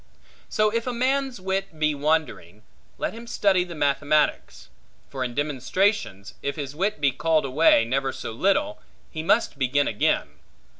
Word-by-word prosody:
So 215 0 +2
if 230 +2 -2
a 250 - -1
man's 260 0 0
wit 190 -2 -3
be 155 -1 +1
wandering, 145 - -2 0.3
let - - -3
him 230 +1 -10
study 195 -5 +2
the 175 -1 -9
mathematics; 145 +1 0 0.4
for 135 -2 -3
in 120 -1 -5
demonstrations, 145 - -1
if 140 0 -3
his 145 -2 -6
wit 195 +2 -1
be 140 -1 +3
called 155 +3 +1
away 135 -3 +4
never 135 +3 -1
so - - -6
little, 200 - 0 0.3
he 155 - -4
must 165 -2 +1
begin 140 +2 +2
again. 105 - 0
155 Hz, 155 wpm, -24 LUFS, 135-200 Hz, 0.4 s, away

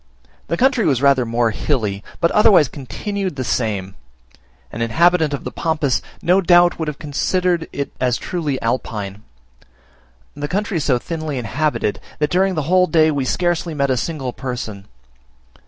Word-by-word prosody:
The 170 - -1
country 255 -2 +3
was 135 -5 +2
rather 135 -3 +3
more 115 0 +1
hilly, 110 -5 -2 0.2
but 170 - +2
otherwise 200 -8 +5
continued 190 - -4
the 130 - -3
same; 100 -6 -2 0.8
an 115 - -6
inhabitant 160 +7 +3
of 140 - -4
the - - -5
Pampas 155 -5 0 0.2
no 185 +3 +4
doubt 175 -1 +4
would 160 - -2
have 150 -2 -4
considered 175 +3 -1
it 140 - -4
as 125 -1 +2
truly 150 -7 -3
Alpine. 105 -4 -3 1.1
The 145 0 -4
country 200 +2 -1
is 150 - -2
so 130 -4 +3
thinly 155 +1 -4
inhabited, 125 0 -1 0.2
that 150 0 0
during 190 +1 +2
the 155 - -1
whole 180 +4 +3
day 160 -2 +4
we 140 -3 -1
scarcely 175 +2 -1
met 140 -2 +1
a - - +2
single 135 -2 -3
person. 110 -6 -6
145 Hz, 160 wpm, -19 LUFS, 125-175 Hz, 1.1 s, otherwise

